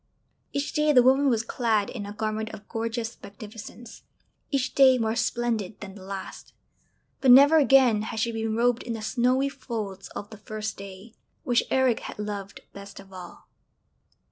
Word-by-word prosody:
Each 280 Hz, +1 st, -3 dB
day 300 Hz, -1 st, +2 dB
the 250 Hz, -4 st, +6 dB
woman 270 Hz, +2 st, +4 dB
was 230 Hz, -2 st, +1 dB
clad 225 Hz, -3 st, 0 dB
in 210 Hz, -5 st, -6 dB
a -, -, -6 dB
garment 215 Hz, +1 st, -3 dB
of 205 Hz, -1 st, -15 dB
gorgeous 230 Hz, 0 st, -4 dB
magnificence, 215 Hz, +3 st, -11 dB, 0.5 s
each 275 Hz, -3 st, -1 dB
day 260 Hz, -2 st, +6 dB
more 225 Hz, -1 st, -1 dB
splendid 230 Hz, -4 st, -2 dB
than 200 Hz, -2 st, -9 dB
the 195 Hz, -, -13 dB
last; 195 Hz, 0 st, -8 dB, 0.7 s
but 265 Hz, -, +2 dB
never 280 Hz, +5 st, +8 dB
again 265 Hz, -7 st, +5 dB
had 220 Hz, +1 st, -5 dB
she 235 Hz, +1 st, 0 dB
been 225 Hz, -1 st, -2 dB
robed 240 Hz, +1 st, +2 dB
in 235 Hz, -, -5 dB
the 225 Hz, -1 st, -6 dB
snowy 255 Hz, +4 st, +1 dB
folds 215 Hz, -8 st, -6 dB
of 205 Hz, -, -7 dB
the 215 Hz, -, -11 dB
first 215 Hz, 0 st, -5 dB
day, 195 Hz, +3 st, -11 dB, 0.3 s
which 240 Hz, -1 st, +1 dB
Eric 260 Hz, -3 st, +2 dB
had -, -, -8 dB
loved 205 Hz, -2 st, -6 dB
best 200 Hz, 0 st, -11 dB
of 195 Hz, -1 st, -15 dB
all. 180 Hz, -2 st, -11 dB
225 Hz, 170 wpm, -26 LUFS, 210-250 Hz, 0.7 s, never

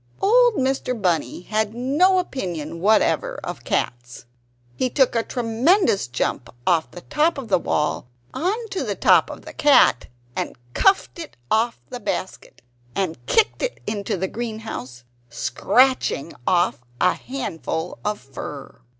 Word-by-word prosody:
Old 485 Hz, +2 st, +5 dB
Mr. 260 Hz, -3 st, -1 dB
Bunny 175 Hz, -4 st, 0 dB
had 215 Hz, +3 st, -1 dB
no 295 Hz, +10 st, +3 dB
opinion 175 Hz, -, -3 dB
whatever 220 Hz, -, +2 dB
of -, -, -6 dB
cats. 120 Hz, 0 st, -3 dB, 0.5 s
He 255 Hz, -, 0 dB
took 265 Hz, -1 st, +3 dB
a 230 Hz, -, +2 dB
tremendous 245 Hz, -, +2 dB
jump 120 Hz, 0 st, -2 dB, 0.2 s
off 170 Hz, -3 st, +2 dB
the 175 Hz, -, -10 dB
top 305 Hz, -, +1 dB
of 260 Hz, -5 st, -6 dB
the 185 Hz, -3 st, +4 dB
wall 150 Hz, -6 st, -1 dB, 0.3 s
on 425 Hz, +7 st, -1 dB
to 390 Hz, -, -2 dB
the -, -, -2 dB
top -, -, +4 dB
of -, -, -9 dB
the -, -, -9 dB
cat, 280 Hz, -, +4 dB, 0.3 s
and -, -, -3 dB, 0.2 s
cuffed 385 Hz, -2 st, +2 dB
it 325 Hz, -, -8 dB
off 230 Hz, +2 st, +2 dB
the 250 Hz, -, -5 dB
basket, 190 Hz, -, -5 dB, 0.3 s
and 185 Hz, -4 st, -2 dB
kicked 455 Hz, -3 st, +2 dB
it -, -, -2 dB
into 205 Hz, -1 st, -2 dB
the 190 Hz, +2 st, -1 dB
greenhouse, 215 Hz, -, -6 dB, 0.3 s
scratching 140 Hz, -, +1 dB
off 175 Hz, -7 st, +2 dB, 0.2 s
a 180 Hz, -, +4 dB
handful 180 Hz, -, -4 dB
of 210 Hz, 0 st, -1 dB
fur. 135 Hz, +1 st, -9 dB
220 Hz, 140 wpm, -22 LUFS, 170-280 Hz, 0.5 s, Old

